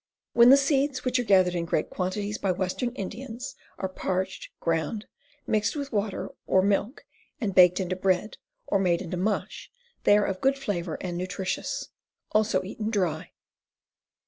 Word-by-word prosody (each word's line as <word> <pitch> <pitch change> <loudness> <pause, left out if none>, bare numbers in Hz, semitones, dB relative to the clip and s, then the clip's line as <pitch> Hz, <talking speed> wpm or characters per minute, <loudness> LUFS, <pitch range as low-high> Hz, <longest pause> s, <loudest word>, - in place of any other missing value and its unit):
When 235 +1 +7
the 275 - +9
seeds, 275 -1 +1
which 255 0 +2
are - - +1
gathered 185 -5 +4
in 170 -1 -1
great 170 - -1
quantities 200 +3 -2
by 195 - +1
western 185 +7 -1
Indians, 235 +4 -6 0.2
are 190 - -2
parched, 185 0 -3
ground, 165 +6 -1 0.4
mixed 210 +3 +1
with 285 -1 -4
water 205 -2 -2 0.2
or 185 - +4
milk 205 +6 0 0.3
and 210 -7 -1
baked 180 0 +6
into 185 -1 -1
bread 185 +2 0 0.3
or 200 - +1
made 180 -1 +2
into 180 0 -4
mush, 205 +3 -2 0.3
they 205 - +6
are 210 - +2
of 190 -1 -3
good 270 +1 +3
flavor 175 - -3
and 175 -1 -3
nutritious. 185 +1 -3 0.4
Also 215 -3 +2
eaten 210 +3 -4
dry. 180 -6 -1
195 Hz, 160 wpm, -27 LUFS, 185-225 Hz, 0.4 s, the